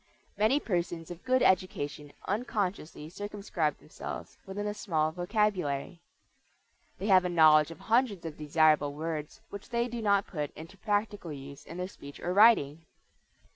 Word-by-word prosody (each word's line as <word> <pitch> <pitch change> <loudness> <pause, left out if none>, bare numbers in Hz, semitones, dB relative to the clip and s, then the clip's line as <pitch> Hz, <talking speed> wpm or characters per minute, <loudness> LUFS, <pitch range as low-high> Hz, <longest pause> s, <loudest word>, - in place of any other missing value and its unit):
Many 215 +8 +3
persons 175 - -3
of 175 0 -8
good 255 0 +2
education 150 -6 0
unconsciously 195 -8 -2
circumscribe 195 -4 -3
themselves - - -8
within 205 +2 -4
a 210 - -1
small 160 -7 0
vocabulary. 180 -4 -1 1.0
They 195 - -5
have 190 -3 +6
a 180 - -1
knowledge 155 -3 +6
of 165 - -11
hundreds 225 -6 +1
of 160 -2 -5
desirable 150 -1 +3
words 155 -1 -5
which 200 0 -9
they 235 0 0
do 235 -1 -5
not 200 -2 +3
put 150 -4 -4
into 165 +5 -10
practical 205 -3 -2
use 140 -1 -10
in 170 - -8
their 180 0 -3
speech 140 -6 -12
or 180 - -2
writing. 165 -8 +5
180 Hz, 150 wpm, -30 LUFS, 155-205 Hz, 1.0 s, have